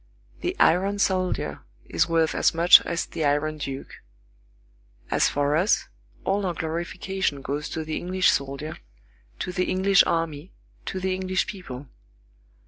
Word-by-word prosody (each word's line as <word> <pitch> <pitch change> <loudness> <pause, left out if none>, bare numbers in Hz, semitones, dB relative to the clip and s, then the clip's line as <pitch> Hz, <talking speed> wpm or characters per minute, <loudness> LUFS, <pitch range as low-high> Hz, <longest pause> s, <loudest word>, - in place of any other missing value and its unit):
The 360 +1 -2
iron 195 +4 +3
soldier 185 -2 0 0.3
is - - 0
worth 165 -1 +2
as - - +2
much 170 +2 +8
as 170 0 -1
the 160 - -4
Iron 150 +1 0
Duke. 135 -1 -6 1.1
As - - +3
for 145 +1 +1
us, 180 +6 +2 0.4
all 200 +1 +1
our 175 - -2
glorification 170 -1 -3
goes 145 +2 -3
to 160 - -4
the 155 0 -3
English 185 +1 +2
soldier, 140 +3 -3 0.6
to - - -4
the 180 0 0
English 195 +1 +4
army, 165 0 -2 0.3
to 190 - -3
the 185 0 -1
English 185 0 -1
people. 180 - -8
170 Hz, 140 wpm, -25 LUFS, 150-185 Hz, 1.1 s, much